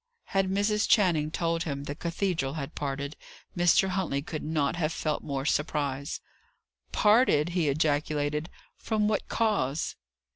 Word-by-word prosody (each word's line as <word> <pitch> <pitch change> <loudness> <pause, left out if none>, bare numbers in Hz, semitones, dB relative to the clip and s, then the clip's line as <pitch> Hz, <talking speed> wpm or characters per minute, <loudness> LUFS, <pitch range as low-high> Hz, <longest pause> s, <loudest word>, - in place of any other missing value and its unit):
Had 195 -1 +2
Mrs. 205 +2 +1
Channing 170 -8 +4
told 165 +1 -1
him 140 -4 -3
the 145 - -4
cathedral 170 -3 -1
had 140 -4 -5
parted, 140 +1 -3 0.4
Mr. 175 +2 +4
Huntley 180 -7 -1
could 155 0 -5
not 155 0 0
have 165 -2 0
felt 155 -2 -2
more 135 -1 -3
surprise. 145 -2 -1 0.7
"Parted!" 210 - +4
he 170 -4 +1
ejaculated. 150 +1 0 0.3
"From 215 -2 0
what 210 -1 0
cause?" 195 - 0
155 Hz, 135 wpm, -28 LUFS, 145-185 Hz, 0.7 s, Channing